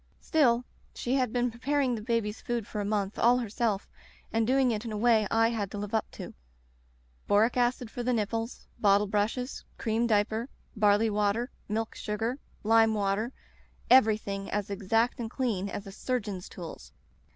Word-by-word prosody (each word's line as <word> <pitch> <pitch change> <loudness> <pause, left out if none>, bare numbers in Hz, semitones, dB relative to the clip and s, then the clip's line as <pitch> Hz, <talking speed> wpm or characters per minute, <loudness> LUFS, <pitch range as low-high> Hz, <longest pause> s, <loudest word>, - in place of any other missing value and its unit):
Still, 250 -6 +2 0.3
she 245 - -2
had 255 -4 +1
been 245 0 0
preparing 265 +2 0
the 225 - -3
baby's 220 -1 -1
food 240 -3 -2
for 210 - -4
a - - -2
month 205 -1 -1
all 240 +2 +5
herself 225 -3 -1 0.5
and 225 0 +2
doing 260 -1 +3
it 215 -1 -2
in 230 - -5
a 215 - -3
way 220 -1 +4
I 225 0 +3
had 215 -4 -2
to 205 - -6
live 205 +1 -5
up 220 - 0
to: - - -8 0.9
boric 215 +4 +3
acid 245 -1 0
for 245 - -4
the 250 +1 0
nipples, 225 +1 -2
bottle 205 -1 +4
brushes, 210 +6 -1
cream 230 +1 0
dipper, 220 +3 +1 0.3
barley 210 +1 +3
water, 210 +4 0 0.2
milk 225 +1 -2
sugar, 225 +5 -3 0.2
lime 225 0 +4
water 205 +3 0 0.3
— - - -17
everything 210 -5 +4
as 205 -1 -2
exact 225 +5 +1
and 230 -2 -3
clean 220 -7 -1
as 205 - -5
a 195 - -8
sur 250 +5 -1
geon's 200 -4 -7
tools. 160 - -9
225 Hz, 175 wpm, -29 LUFS, 205-240 Hz, 0.9 s, all